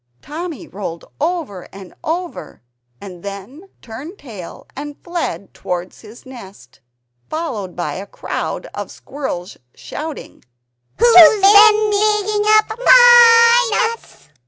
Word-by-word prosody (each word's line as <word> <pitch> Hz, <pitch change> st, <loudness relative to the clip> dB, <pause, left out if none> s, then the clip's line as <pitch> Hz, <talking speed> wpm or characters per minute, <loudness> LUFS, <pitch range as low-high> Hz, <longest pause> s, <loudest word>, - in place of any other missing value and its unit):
Timmy 325 Hz, 0 st, -8 dB
rolled 175 Hz, -4 st, -8 dB, 0.2 s
over 310 Hz, -, -4 dB
and 195 Hz, -2 st, -13 dB
over, 340 Hz, -, -6 dB, 0.4 s
and 185 Hz, -3 st, -11 dB
then 200 Hz, -, -10 dB
turned 275 Hz, -, -10 dB
tail 210 Hz, -, -11 dB
and 290 Hz, 0 st, -8 dB
fled 345 Hz, -, -5 dB
towards 180 Hz, 0 st, -6 dB
his 225 Hz, +3 st, -15 dB
nest, 195 Hz, -, -14 dB, 0.5 s
followed 235 Hz, -, -5 dB
by 175 Hz, -, -4 dB
a 195 Hz, +2 st, -8 dB
crowd -, -, -6 dB
of -, -, -7 dB
squirrels 205 Hz, -11 st, -7 dB, 0.2 s
shouting 310 Hz, 0 st, -9 dB, 0.5 s
"Who's 420 Hz, -4 st, +6 dB
been 420 Hz, +2 st, +6 dB
digging 420 Hz, 0 st, 0 dB
up 430 Hz, +1 st, +2 dB
MY 480 Hz, -1 st, +6 dB, 0.2 s
nuts?" 140 Hz, -, -18 dB
315 Hz, 110 wpm, -17 LUFS, -, 0.5 s, Who's